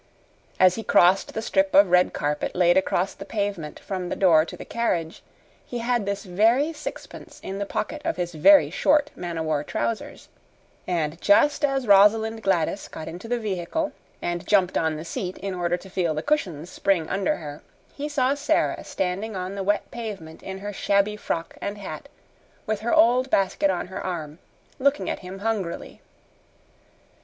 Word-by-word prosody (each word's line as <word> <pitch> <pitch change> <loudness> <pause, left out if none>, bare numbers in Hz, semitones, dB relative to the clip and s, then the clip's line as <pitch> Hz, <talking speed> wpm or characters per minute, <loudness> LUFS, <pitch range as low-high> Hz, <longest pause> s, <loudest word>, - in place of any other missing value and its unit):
As 185 -1 +6
he 225 - -5
crossed 190 -1 +4
the 220 - -2
strip 195 -2 +1
of 195 -2 +6
red 180 0 +5
carpet 150 0 -2
laid 175 -1 +4
across 190 0 +1
the - - -9
pavement 200 -7 -3
from 185 -2 -4
the - - -2
door 165 -5 +5
to - - -9
the - - -9
carriage, 170 -9 -2 0.4
he 245 - -6
had 235 -3 0
this 200 0 -2
very 225 - +2
sixpence 305 -1 -9
in 195 +1 -5
the 200 - -3
pocket 300 +10 -3
of - - -2
his 175 -1 -3
very 235 - +6
short 295 0 +2
man 175 -2 -5
o 160 - -1
war 155 -2 0
trousers; 225 +8 -4 0.6
And 165 -2 -2
just 290 +9 +4
as 270 -2 +1
Rosalind 220 +2 +5
Gladys 195 -1 0
got 160 - -8
into 180 +7 -8
the 245 +1 0
vehicle 215 - -2 0.3
and 175 0 -3
jumped 190 -3 +3
on 160 -1 +1
the 155 +2 -7
seat 180 +2 -4
in 195 -1 -4
order 175 -1 0
to 190 - -13
feel 180 -4 -1
the 155 - -3
cushions 180 - -1
spring 180 -5 +1
under 195 0 0
her, 150 -2 -8 0.3
he 295 +1 -5
saw 270 -2 +2
Sara 285 0 0
standing 195 +4 -3
on 185 +1 -4
the 200 - -4
wet 205 +2 0
pavement 200 -9 -7
in 190 0 -6
her 205 - -4
shabby 200 +2 +1
frock 170 -5 -4
and 205 +1 -4
hat, 205 - -8 0.6
with 215 -1 -1
her 230 +2 -2
old 250 +3 +4
basket 195 -2 +2
on 180 -2 -1
her 190 +1 -7
arm, 160 -4 -5 0.4
looking 280 +2 +1
at - - -4
him 185 +1 -8
hungrily. 205 -7 -3
195 Hz, 180 wpm, -24 LUFS, 175-225 Hz, 0.6 s, As